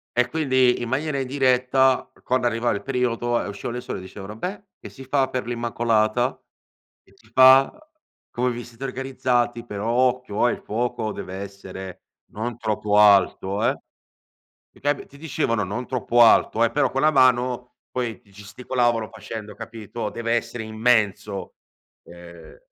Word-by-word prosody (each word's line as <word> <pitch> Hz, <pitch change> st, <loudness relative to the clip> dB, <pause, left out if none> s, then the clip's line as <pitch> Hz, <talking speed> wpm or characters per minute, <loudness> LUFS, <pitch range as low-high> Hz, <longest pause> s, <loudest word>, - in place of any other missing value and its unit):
E 125 Hz, 0 st, +3 dB
quindi 130 Hz, -4 st, +2 dB
in 120 Hz, -, -4 dB
maniera 140 Hz, +2 st, -1 dB
indiretta 130 Hz, 0 st, +2 dB
quando 125 Hz, -1 st, 0 dB
arrivava 120 Hz, -1 st, +1 dB
il 100 Hz, -, -4 dB
periodo 120 Hz, -2 st, 0 dB
e -, -, -5 dB
uscivano 100 Hz, +4 st, -5 dB
le 125 Hz, -, -4 dB
suore 125 Hz, -, -6 dB
dicevano: 95 Hz, +3 st, -9 dB
"Beh, 190 Hz, -, -5 dB, 0.2 s
che -, -, -11 dB
si 135 Hz, -1 st, -12 dB
fa 135 Hz, 0 st, +1 dB
per 130 Hz, -2 st, -3 dB
l'Immacolata? 120 Hz, 0 st, 0 dB, 0.7 s
Che -, -, -26 dB
si 110 Hz, -, -24 dB
fa? 130 Hz, +1 st, +7 dB, 0.6 s
Come 125 Hz, +1 st, -1 dB
vi 120 Hz, 0 st, -6 dB
siete 120 Hz, +2 st, -12 dB
organizzati? 125 Hz, -2 st, -1 dB
Però 105 Hz, 0 st, -4 dB
occhio, 125 Hz, -2 st, +1 dB
ehm, -, -, -1 dB
il -, -, -15 dB
fuoco 115 Hz, -1 st, -2 dB
deve 95 Hz, -, -7 dB
essere 95 Hz, -1 st, -8 dB, 0.3 s
non 115 Hz, +2 st, -4 dB
troppo 105 Hz, -2 st, 0 dB
alto, 100 Hz, 0 st, +4 dB
ehm". 115 Hz, -, +2 dB, 1.0 s
Ti -, -, -21 dB
ca 145 Hz, +1 st, +2 dB
ti 140 Hz, -, -13 dB
dicevano 145 Hz, -8 st, -1 dB
non 110 Hz, +7 st, -4 dB
troppo 120 Hz, -2 st, +2 dB
alto 115 Hz, 0 st, +5 dB
eh, 115 Hz, -, +2 dB
però 135 Hz, -2 st, +1 dB
con 135 Hz, -, -1 dB
la 155 Hz, -, +5 dB
mano 125 Hz, -2 st, +2 dB
poi 120 Hz, -3 st, -3 dB
ti 100 Hz, -5 st, -25 dB
gesticolavano 115 Hz, +3 st, -1 dB
facendo, 105 Hz, -2 st, -8 dB
capito: 115 Hz, -1 st, -6 dB
"Deve 115 Hz, 0 st, -3 dB
essere 115 Hz, 0 st, -3 dB
immenso". 110 Hz, -4 st, 0 dB, 0.5 s
Ehm 85 Hz, -, -13 dB
120 Hz, 155 wpm, -23 LUFS, 110-130 Hz, 1.0 s, fa